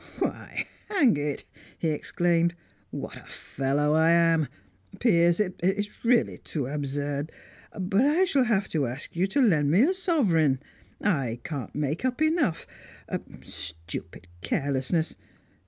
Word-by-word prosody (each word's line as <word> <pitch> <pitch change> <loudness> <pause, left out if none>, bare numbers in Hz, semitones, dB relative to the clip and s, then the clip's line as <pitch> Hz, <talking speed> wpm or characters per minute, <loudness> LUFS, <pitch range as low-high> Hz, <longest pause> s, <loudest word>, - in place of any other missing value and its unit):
"Why, - - -2 0.2
hang 295 - +4
it!" 145 -1 -3 0.3
he 165 - 0
exclaimed. 170 +2 +1 0.3
"What - - -6
a - - -14
fellow 145 +2 -1
I 160 +1 +4
am! 165 -2 +4 0.5
Piers, 170 -6 +4
it's 195 +1 0
really 235 0 +2
too 145 -5 -4
absurd, 145 +1 -3 0.5
but 195 +3 +2
I 320 +6 +4
shall 275 -7 +2
have 205 -5 +1
to 145 -5 0
ask 125 +7 -7
you 180 +3 +2
to 245 +9 0
lend 165 - +4
me 185 +10 +5
a 350 +7 +3
sovereign; 200 - +2 0.4
I 135 - 0
can't 140 -8 -5
make 150 - -1
up 255 +1 0
enough 310 - +1 0.8
stupid 85 +2 -7
carelessness! 140 - 0
165 Hz, 130 wpm, -27 LUFS, 145-210 Hz, 0.8 s, me